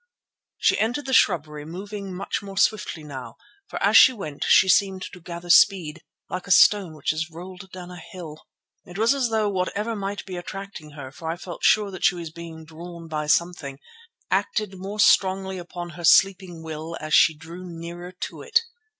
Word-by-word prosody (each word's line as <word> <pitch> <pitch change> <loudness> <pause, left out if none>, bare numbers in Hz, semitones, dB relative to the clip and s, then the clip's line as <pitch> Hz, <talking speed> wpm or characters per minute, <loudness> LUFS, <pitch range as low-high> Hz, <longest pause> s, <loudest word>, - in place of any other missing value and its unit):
She - - +2
entered 240 +7 0
the 265 - -3
shrubbery, 150 -8 +2
moving 195 +5 -7
much 185 +2 -3
more 195 -1 -9
swiftly 190 -6 +1
now, 135 -4 -8 0.3
for - - -6
as - - +3
she - - +9
went 155 - -6
she 190 - +6
seemed 190 0 +3
to 180 - -11
gather 170 +1 -4
speed, 170 -5 +4 0.3
like 180 +1 -5
a - - -10
stone 185 -3 +5
which 155 0 -1
is 160 +1 -3
rolled 180 +3 -10
down 180 -1 -9
a 180 - -9
hill. 160 -3 -10 0.4
It 175 - -11
was 225 +4 +4
as 265 -4 0
though 220 -1 +1
whatever 205 +3 -2
might 200 0 -4
be 185 -2 -6
attracting 175 -4 -8
her, 140 -3 -9
for 160 +3 -7
I 165 - -2
felt 175 -1 -9
sure 210 -2 +4
that 185 - -8
she 180 - +4
was 170 -2 -7
being 165 -1 -10
drawn 170 +1 -10
by 150 -1 -3
something, 155 -4 0 0.5
acted 210 -3 0
more 200 +3 -6
strongly 190 -2 +3
upon 175 0 -7
her 175 +1 -10
sleeping 180 0 +4
will 160 +1 -6
as 155 0 -5
she 160 - +6
drew 165 +4 -10
nearer 175 0 -8
to - - -5
it. 465 0 +2
180 Hz, 190 wpm, -24 LUFS, 160-195 Hz, 0.5 s, she